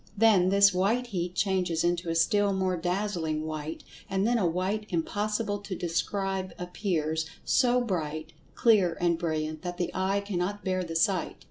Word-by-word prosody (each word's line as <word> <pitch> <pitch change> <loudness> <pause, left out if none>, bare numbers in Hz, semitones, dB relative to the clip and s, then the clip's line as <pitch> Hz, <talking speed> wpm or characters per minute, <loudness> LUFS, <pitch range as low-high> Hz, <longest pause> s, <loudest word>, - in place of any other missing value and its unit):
Then 200 -4 +5
this 200 0 +5
"white 210 +7 +1
heat" 180 -6 -3
changes 180 -4 +1
into 175 0 0
a 165 - -1
still 200 +5 +3
more 190 -1 0
dazzling 175 -3 -2
white, 155 0 -5 0.3
and 195 0 0
then 240 +1 +2
a 185 - +2
white 190 +5 -1
impossible 205 +4 -1
to 200 -2 -6
describe 190 +2 -2
appears, 160 -4 -2 0.2
so 250 -1 +3
bright, 155 -7 -3 0.2
clear 200 -8 +4
and 170 -2 +1
brilliant 155 -2 -2
that 175 -1 -5
the 175 - -2
eye 195 +2 0
cannot 200 +1 -3
bear 185 -1 0
the 165 -2 -6
sight. 185 +4 +1
185 Hz, 160 wpm, -28 LUFS, 165-205 Hz, 0.3 s, Then